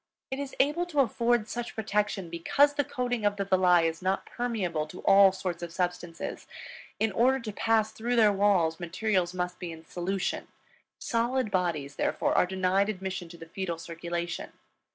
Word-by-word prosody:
It 265 Hz, -, -2 dB
is 280 Hz, -1 st, -5 dB
able 300 Hz, +6 st, +2 dB
to 295 Hz, -5 st, +2 dB
afford 235 Hz, -2 st, +1 dB
such 240 Hz, 0 st, -5 dB
protection, 210 Hz, -4 st, -1 dB
because 280 Hz, +13 st, +3 dB
the 290 Hz, -, +1 dB
coating 245 Hz, -3 st, -2 dB
of 205 Hz, 0 st, +2 dB
the 200 Hz, -1 st, -2 dB
villi 180 Hz, -3 st, +4 dB
is 165 Hz, +1 st, -2 dB
not 190 Hz, +1 st, 0 dB
permeable 190 Hz, -11 st, -2 dB
to 180 Hz, -, -10 dB
all 195 Hz, 0 st, +7 dB
sorts 185 Hz, -2 st, -4 dB
of 170 Hz, -1 st, -5 dB
substances. 175 Hz, -1 st, -4 dB, 0.5 s
In 220 Hz, -1 st, +2 dB
order 255 Hz, +6 st, +3 dB
to 225 Hz, -4 st, -5 dB
pass 220 Hz, 0 st, +2 dB
through 235 Hz, +3 st, -2 dB
their 215 Hz, -3 st, +5 dB
walls, 190 Hz, -5 st, +2 dB
material 185 Hz, +1 st, 0 dB
must 180 Hz, 0 st, -3 dB
be 175 Hz, -2 st, -5 dB
in 160 Hz, 0 st, -11 dB
solution; 180 Hz, +3 st, -2 dB, 0.5 s
solid 240 Hz, -1 st, 0 dB
bodies, 165 Hz, -7 st, -1 dB
therefore, -, -, 0 dB
are -, -, +4 dB
denied 190 Hz, +2 st, +1 dB
admission 185 Hz, -3 st, -4 dB
to 170 Hz, -, -11 dB
the 165 Hz, -, -10 dB
fetal 170 Hz, 0 st, -4 dB
circulation. 170 Hz, +1 st, -5 dB
195 Hz, 175 wpm, -28 LUFS, 175-225 Hz, 0.5 s, all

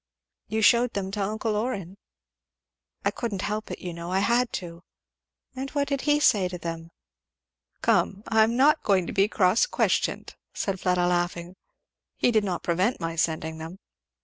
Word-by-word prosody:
"You 220 Hz, 0 st, -1 dB
shewed 235 Hz, +2 st, +4 dB
them 190 Hz, -1 st, -2 dB
to 205 Hz, 0 st, -3 dB
uncle 215 Hz, +2 st, -1 dB
Orrin?" 210 Hz, -5 st, -3 dB, 1.2 s
"Couldn't 210 Hz, -6 st, -3 dB
help 210 Hz, +1 st, -3 dB
it, -, -, -5 dB
you 175 Hz, -1 st, -6 dB
know. 170 Hz, +1 st, -6 dB
I 190 Hz, -, +1 dB
had 235 Hz, +5 st, +2 dB
to." 170 Hz, -1 st, -6 dB, 0.7 s
"And 265 Hz, +1 st, -4 dB
what 280 Hz, 0 st, +1 dB
did 280 Hz, -1 st, -1 dB
he 295 Hz, 0 st, +4 dB
say 205 Hz, -10 st, +4 dB
to 180 Hz, 0 st, -6 dB
them?" 165 Hz, -1 st, -6 dB, 0.9 s
"Come! 200 Hz, +1 st, +2 dB
I'm 225 Hz, +1 st, +3 dB
not 300 Hz, +4 st, +4 dB
going 190 Hz, -3 st, +2 dB
to -, -, -5 dB
be 195 Hz, +1 st, +3 dB
cross 195 Hz, -, +3 dB
questioned," -, -, 0 dB, 0.2 s
said 195 Hz, -2 st, -2 dB
Fleda 180 Hz, -1 st, +1 dB
laughing. 175 Hz, 0 st, -1 dB, 0.6 s
"He -, -, +3 dB
did 215 Hz, -2 st, +3 dB
not 185 Hz, -4 st, -3 dB
prevent 185 Hz, +8 st, +1 dB
my 165 Hz, 0 st, -3 dB
sending 160 Hz, -1 st, -1 dB
them." 165 Hz, +3 st, -8 dB
195 Hz, 165 wpm, -26 LUFS, 175-225 Hz, 1.2 s, shewed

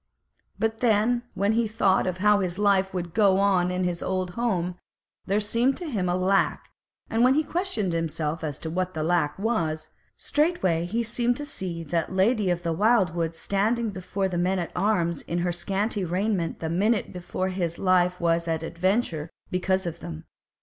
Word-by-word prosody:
But 225 Hz, 0 st, -1 dB
then 235 Hz, +1 st, +3 dB
when 200 Hz, +2 st, +2 dB
he 230 Hz, 0 st, +2 dB
thought 200 Hz, -4 st, +2 dB
of 185 Hz, -1 st, -2 dB
how 210 Hz, +1 st, +4 dB
his 180 Hz, -2 st, -2 dB
life 195 Hz, -2 st, +3 dB
would 175 Hz, -3 st, -4 dB
go 195 Hz, -2 st, +4 dB
in 180 Hz, +1 st, 0 dB
his 175 Hz, -1 st, -1 dB
old 185 Hz, -1 st, -1 dB
home, 180 Hz, -5 st, -1 dB, 0.5 s
there 200 Hz, +2 st, +2 dB
seemed 230 Hz, +5 st, +1 dB
to 355 Hz, -, -4 dB
him 200 Hz, -10 st, -1 dB
a 175 Hz, -, +1 dB
lack, 190 Hz, +2 st, +1 dB, 0.4 s
and 225 Hz, +1 st, +1 dB
when 255 Hz, +2 st, +5 dB
he 310 Hz, -, +3 dB
questioned 310 Hz, -, -1 dB
himself 160 Hz, -1 st, -2 dB
as 150 Hz, -3 st, -3 dB
to 160 Hz, -, -4 dB
what 185 Hz, +1 st, -2 dB
that 155 Hz, -, -1 dB
lack 165 Hz, -3 st, +1 dB
was, 165 Hz, -8 st, -1 dB, 0.3 s
straightway 240 Hz, -, +1 dB
he 230 Hz, +5 st, -1 dB
seemed 240 Hz, +2 st, 0 dB
to 290 Hz, -, -4 dB
see 175 Hz, -, -5 dB
that 165 Hz, +2 st, -1 dB
Lady 200 Hz, +2 st, +2 dB
of 175 Hz, -1 st, -1 dB
the 165 Hz, -1 st, 0 dB
Wildwood 175 Hz, -5 st, +2 dB
standing 215 Hz, +6 st, 0 dB
before 190 Hz, +1 st, -2 dB
the 180 Hz, -2 st, -2 dB
men 185 Hz, +2 st, +1 dB
at 175 Hz, -2 st, -3 dB
arms 180 Hz, -5 st, +1 dB
in 170 Hz, -, -4 dB
her 175 Hz, -, +1 dB
scanty 195 Hz, +4 st, -1 dB
raiment 180 Hz, 0 st, -1 dB
the 160 Hz, -, -2 dB
minute 210 Hz, +5 st, +1 dB
before 185 Hz, +1 st, -3 dB
his 175 Hz, -3 st, -2 dB
life 180 Hz, -1 st, +2 dB
was 170 Hz, 0 st, +1 dB
at 165 Hz, -1 st, -1 dB
adventure 170 Hz, -2 st, -1 dB, 0.2 s
because 190 Hz, +1 st, 0 dB
of 170 Hz, -, -4 dB
them. 80 Hz, -1 st, -7 dB
185 Hz, 185 wpm, -26 LUFS, 170-215 Hz, 0.5 s, when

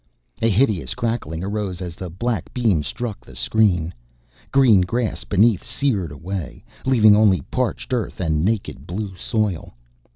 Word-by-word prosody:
A 115 Hz, -, +3 dB
hideous 105 Hz, -3 st, +1 dB
crackling 115 Hz, -9 st, -2 dB
arose 100 Hz, -2 st, -3 dB
as 90 Hz, -3 st, -5 dB
the 90 Hz, +1 st, -7 dB
black 110 Hz, +2 st, -3 dB
beam 110 Hz, -10 st, +2 dB
struck 100 Hz, -, -5 dB
the 65 Hz, -, -14 dB
screen. 90 Hz, -, +1 dB, 0.6 s
Green 125 Hz, -8 st, +6 dB
grass 115 Hz, +5 st, -1 dB
beneath 105 Hz, 0 st, +3 dB
seared 105 Hz, -, -1 dB
away, 85 Hz, +3 st, -6 dB, 0.2 s
leaving 110 Hz, -5 st, +6 dB
only 105 Hz, -6 st, +4 dB
parched 125 Hz, 0 st, -2 dB
earth 120 Hz, -3 st, -2 dB
and 80 Hz, -4 st, 0 dB
naked 100 Hz, -, -2 dB
blue 95 Hz, +2 st, -4 dB
soil. 100 Hz, -, -2 dB
100 Hz, 140 wpm, -22 LUFS, 90-115 Hz, 0.6 s, Green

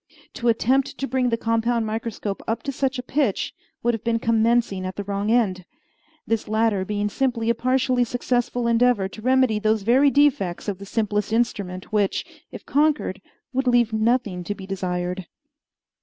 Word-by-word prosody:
To 240 Hz, -, -3 dB
attempt 260 Hz, +4 st, +2 dB
to 275 Hz, -, -3 dB
bring 255 Hz, -1 st, +1 dB
the 230 Hz, -, 0 dB
compound 230 Hz, 0 st, 0 dB
microscope 220 Hz, -2 st, -4 dB
up 225 Hz, -, -2 dB
to 280 Hz, -, -2 dB
such 270 Hz, 0 st, -1 dB
a 250 Hz, -, -4 dB
pitch 260 Hz, -5 st, 0 dB, 0.3 s
would 240 Hz, 0 st, +2 dB
have 225 Hz, -, -4 dB
been 230 Hz, 0 st, +1 dB
commencing 230 Hz, -3 st, +1 dB
at 185 Hz, 0 st, -4 dB
the 205 Hz, -, -4 dB
wrong 200 Hz, +1 st, -2 dB
end; 210 Hz, -6 st, +2 dB, 0.6 s
this 225 Hz, -1 st, -1 dB
latter 215 Hz, -2 st, +1 dB
being 205 Hz, +1 st, -1 dB
simply 235 Hz, 0 st, 0 dB
a -, -, +2 dB
partially 255 Hz, +1 st, +1 dB
successful 245 Hz, 0 st, -1 dB
endeavor 235 Hz, -3 st, +3 dB
to 215 Hz, -, -11 dB
remedy 255 Hz, -3 st, +3 dB
those 215 Hz, -1 st, +1 dB
very 260 Hz, +6 st, +5 dB
defects 265 Hz, -13 st, +2 dB
of 200 Hz, -2 st, -3 dB
the 200 Hz, -, -9 dB
simplest 210 Hz, -1 st, -1 dB
instrument 205 Hz, -5 st, -2 dB
which, 205 Hz, -2 st, +1 dB, 0.3 s
if -, -, -10 dB
conquered, 290 Hz, -9 st, +1 dB, 0.3 s
would 265 Hz, 0 st, 0 dB
leave 240 Hz, -2 st, +3 dB
nothing 220 Hz, -5 st, +1 dB
to 205 Hz, -, -3 dB
be 190 Hz, -, -9 dB
desired. 180 Hz, -1 st, -3 dB
230 Hz, 170 wpm, -23 LUFS, 205-245 Hz, 0.6 s, very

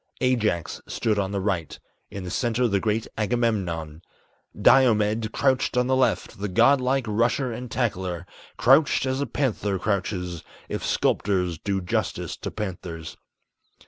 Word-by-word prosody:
Ajax 110 Hz, -10 st, 0 dB
stood 105 Hz, -2 st, 0 dB
on 95 Hz, -1 st, -1 dB
the 100 Hz, -, -1 dB
right; 95 Hz, -5 st, -2 dB, 0.3 s
in 100 Hz, -, -7 dB
the 90 Hz, -, -6 dB
center 120 Hz, +3 st, +1 dB
the 100 Hz, -3 st, +1 dB
great 110 Hz, +2 st, -1 dB
Agamemnon; 95 Hz, -9 st, -1 dB, 0.6 s
Diomed 110 Hz, -3 st, +4 dB
crouched 130 Hz, -2 st, +1 dB
on 125 Hz, -, +3 dB
the 130 Hz, +1 st, +2 dB
left, 110 Hz, -8 st, 0 dB
the 105 Hz, -, -2 dB
god 120 Hz, +8 st, +4 dB
like 130 Hz, 0 st, +1 dB
rusher 120 Hz, +4 st, +1 dB
and 125 Hz, +2 st, -6 dB
tackler, 95 Hz, -8 st, -2 dB, 0.3 s
Crouched 135 Hz, +3 st, +4 dB
as 130 Hz, +1 st, -1 dB
a 140 Hz, -, -1 dB
panther 105 Hz, -8 st, -1 dB
crouches, 90 Hz, -4 st, -2 dB, 0.2 s
if -, -, -4 dB
sculptors 90 Hz, -5 st, 0 dB
do 100 Hz, -1 st, -1 dB
justice 90 Hz, -, -2 dB
to -, -, -5 dB
panthers. 90 Hz, -6 st, -6 dB
105 Hz, 145 wpm, -25 LUFS, 95-125 Hz, 0.6 s, Diomed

